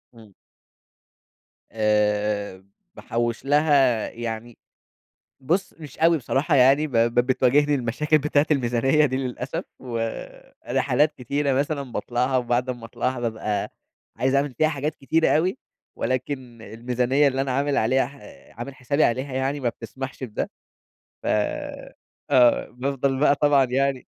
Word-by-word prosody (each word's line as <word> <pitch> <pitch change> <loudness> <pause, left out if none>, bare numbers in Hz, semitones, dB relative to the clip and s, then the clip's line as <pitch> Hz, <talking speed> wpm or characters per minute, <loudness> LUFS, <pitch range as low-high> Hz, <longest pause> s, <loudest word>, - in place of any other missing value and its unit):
إمم. 110 -3 -16 1.4
آآ 105 -2 0 0.3
باحوّش 120 +1 -3
لها 140 -5 +3
يعني، 115 0 -6 0.8
بُص 170 +9 -1
مش 150 -3 -11
أوي 165 0 +4
بصراحة 140 +4 0
يعني 135 +4 +5
ب 145 - -12
ب 115 +1 +3
بتواجهني 140 +3 +3
المشاكل 140 +5 +1
بتاعة 150 0 +1
الميزانية 135 +2 +2
دي 130 - -2
للأسف، 135 +5 -4
ورحلات 125 +4 -2
كتيرة 140 +3 -1
مثلًا 140 +2 0
باطلعها 125 +2 -1
وبعد 125 0 0
أمّا 120 -2 -7
اطلعها 120 +2 -3
بابقى، 110 -3 -2 0.4
عايز 130 +1 +1
أعمل 140 -1 +1
فيها 155 +6 +2
حاجات 150 0 -3
كتيرة 160 +4 +1
أوي، 180 - +1 0.4
ولكن 130 -3 -3
الميزانية 125 +5 +1
اللي 135 0 -2
أنا 135 -1 -1
عامل 140 +2 0
عليها 125 +3 +2
ح 140 +2 -14 0.4
عامل 130 +3 -6
حسابي 140 +4 0
عليها 130 +3 0
يعني 135 +2 -1
ما 125 - 0
بتسمحش 130 +4 -7
بده، 110 -4 -4 0.7
ف - - -7 1.0
آه 125 -3 +4
بافضل 135 +1 -1
بقى 145 -1 +5
طبعًا 145 -1 +4
يعني 135 +1 -1
130 Hz, 130 wpm, -24 LUFS, 120-145 Hz, 1.4 s, يعني